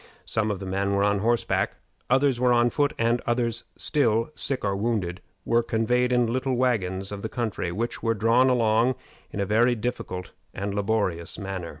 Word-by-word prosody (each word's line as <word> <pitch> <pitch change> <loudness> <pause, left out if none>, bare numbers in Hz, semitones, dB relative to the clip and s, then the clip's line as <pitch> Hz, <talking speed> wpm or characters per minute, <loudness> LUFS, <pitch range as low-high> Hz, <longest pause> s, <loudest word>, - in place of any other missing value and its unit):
Some 110 -1 -1
of 100 -3 -2
the 95 - -6
men 100 +1 0
were 100 - +2
on 100 0 +2
horseback, 115 +3 0 0.3
others 135 -1 +3
were 125 0 +3
on 120 0 +4
foot, 145 0 +1
and 115 +1 +1
others 120 -1 0
still, 115 -3 +1
sick 135 -6 -1
or 100 -1 0
wounded, 100 -4 -1 0.2
were 115 0 +3
conveyed 125 +2 +1
on 125 -1 +3
little 130 +3 -1
wagons 100 -7 0
of 100 -1 -5
the 110 - -4
country, 110 -7 -3
which 115 +7 -3
were 115 -1 +1
drawn 115 +5 +4
along 115 0 +3 0.3
in - - -6
a 100 - +1
very 120 +5 +3
difficult 105 -6 -4 0.2
and 100 +1 -3
laborious 100 -5 -1
manner. 95 -4 -5
115 Hz, 185 wpm, -25 LUFS, 100-120 Hz, 0.3 s, on